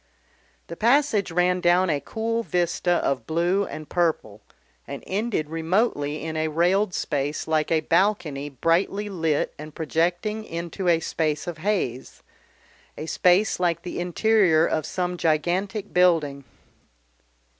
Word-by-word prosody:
The 170 Hz, -, -8 dB
passage 235 Hz, -, +2 dB
ran 180 Hz, +1 st, +1 dB
down 175 Hz, +1 st, +3 dB
a 145 Hz, -, 0 dB
cool 230 Hz, +1 st, -2 dB
vista 175 Hz, -4 st, -1 dB, 0.2 s
of 130 Hz, -5 st, -1 dB
blue 175 Hz, +5 st, +1 dB
and 155 Hz, -1 st, -8 dB
purple 155 Hz, -, -1 dB, 0.5 s
and 140 Hz, -1 st, -7 dB
ended 195 Hz, -6 st, -2 dB
remotely 160 Hz, -3 st, 0 dB
in 160 Hz, 0 st, -4 dB
a 155 Hz, 0 st, 0 dB
railed 180 Hz, +5 st, +1 dB
space 145 Hz, 0 st, -2 dB
like 155 Hz, -1 st, 0 dB
a 160 Hz, -1 st, +3 dB
balcony 165 Hz, -6 st, 0 dB
brightly 170 Hz, +8 st, 0 dB
lit 160 Hz, -6 st, -1 dB
and 150 Hz, 0 st, -9 dB
projecting 175 Hz, +7 st, -1 dB
into 170 Hz, +1 st, -5 dB
a 165 Hz, -1 st, +3 dB
space 155 Hz, -2 st, -1 dB
of 175 Hz, -3 st, -6 dB
haze, 155 Hz, -, -2 dB, 0.7 s
a 155 Hz, -, -5 dB
space 180 Hz, +6 st, +2 dB
like 170 Hz, -2 st, 0 dB
the 175 Hz, -, -5 dB
interior 175 Hz, -2 st, +3 dB
of 155 Hz, -2 st, -1 dB
some 180 Hz, -1 st, -2 dB
gigantic 180 Hz, +6 st, -1 dB
building. 160 Hz, -6 st, +2 dB
170 Hz, 135 wpm, -24 LUFS, 155-190 Hz, 0.7 s, down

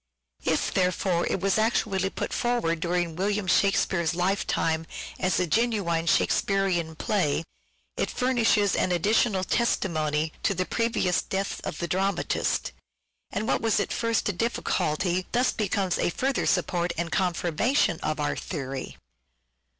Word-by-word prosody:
If, -, -, +1 dB
therefore, 180 Hz, -1 st, +1 dB
it 190 Hz, -, -1 dB
was 195 Hz, +2 st, +2 dB
actually 200 Hz, -4 st, +1 dB
put -, -, -4 dB
forward 240 Hz, -10 st, 0 dB
during 175 Hz, -1 st, -1 dB
William 200 Hz, +3 st, 0 dB
Shakspere's 175 Hz, -3 st, +2 dB
lifetime 175 Hz, -3 st, 0 dB, 0.3 s
as 185 Hz, -2 st, +1 dB
a 180 Hz, -, +2 dB
genuine 175 Hz, -4 st, 0 dB
Shake -, -, +3 dB
spearean 180 Hz, -5 st, 0 dB
play, 165 Hz, -7 st, 0 dB, 0.5 s
it -, -, 0 dB
furnishes 230 Hz, -5 st, +2 dB
an 185 Hz, -, +1 dB
additional 195 Hz, +2 st, +2 dB
testimony 160 Hz, -8 st, 0 dB
to 195 Hz, -, +1 dB
the 185 Hz, +1 st, 0 dB
previous 230 Hz, -6 st, +1 dB
death 195 Hz, +1 st, -3 dB
of -, -, -4 dB
the 170 Hz, -, -3 dB
dramatist, 190 Hz, 0 st, 0 dB, 0.6 s
and 210 Hz, +2 st, -3 dB
what -, -, +1 dB
was 225 Hz, -2 st, +2 dB
at 200 Hz, -, -1 dB
first 230 Hz, -1 st, 0 dB
a 205 Hz, -, 0 dB
difficulty 180 Hz, -4 st, -1 dB
thus 250 Hz, +1 st, +3 dB
becomes 195 Hz, -4 st, -1 dB
a -, -, +2 dB
further 265 Hz, +9 st, -1 dB
support 175 Hz, -2 st, +1 dB
and 170 Hz, 0 st, -2 dB
confirmation 180 Hz, -, +1 dB
of -, -, -2 dB
our -, -, 0 dB
theory. 135 Hz, -5 st, -5 dB
185 Hz, 140 wpm, -26 LUFS, 170-210 Hz, 0.6 s, Shake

